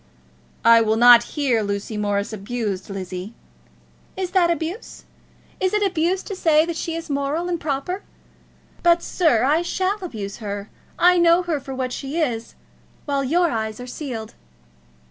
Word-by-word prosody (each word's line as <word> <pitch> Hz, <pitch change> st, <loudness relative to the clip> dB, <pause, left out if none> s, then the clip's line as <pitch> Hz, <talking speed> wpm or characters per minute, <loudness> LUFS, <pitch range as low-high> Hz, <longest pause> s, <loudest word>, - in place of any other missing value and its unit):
"I 230 Hz, 0 st, +7 dB
will 220 Hz, -1 st, +2 dB
not 240 Hz, +1 st, +8 dB, 0.2 s
hear 260 Hz, -6 st, +2 dB
Lucy 200 Hz, +1 st, -3 dB
Morris 205 Hz, 0 st, -1 dB
abused, 210 Hz, -2 st, -4 dB
Lizzie." 190 Hz, +2 st, -6 dB, 0.8 s
"Is 370 Hz, -2 st, -3 dB
that 360 Hz, -3 st, +3 dB
abuse? 340 Hz, +6 st, -4 dB, 0.6 s
Is 375 Hz, +2 st, +1 dB
it 420 Hz, -, +2 dB
abuse 365 Hz, 0 st, 0 dB
to 395 Hz, -, -6 dB
say 315 Hz, -3 st, +3 dB
that 340 Hz, 0 st, -4 dB
she 330 Hz, 0 st, -3 dB
is 330 Hz, 0 st, -5 dB
moral 285 Hz, +4 st, -1 dB
and 345 Hz, -1 st, -2 dB
proper? 300 Hz, +7 st, -2 dB, 0.8 s
But, 345 Hz, 0 st, +4 dB
sir, 310 Hz, -11 st, +2 dB
I 300 Hz, +5 st, +3 dB
shall 375 Hz, +3 st, -1 dB
abuse 210 Hz, -, -6 dB
her. 205 Hz, -2 st, -6 dB, 0.3 s
I 360 Hz, 0 st, +5 dB
know 340 Hz, +1 st, +5 dB
her 330 Hz, -4 st, -1 dB
for 270 Hz, -1 st, -7 dB
what 255 Hz, -1 st, -3 dB
she 275 Hz, +5 st, -5 dB
is, 235 Hz, -7 st, -2 dB, 0.5 s
while 280 Hz, -1 st, 0 dB
your 335 Hz, +5 st, +2 dB
eyes 220 Hz, 0 st, -3 dB
are 245 Hz, -, -7 dB
sealed. 245 Hz, -4 st, -6 dB
280 Hz, 160 wpm, -22 LUFS, 220-340 Hz, 0.8 s, not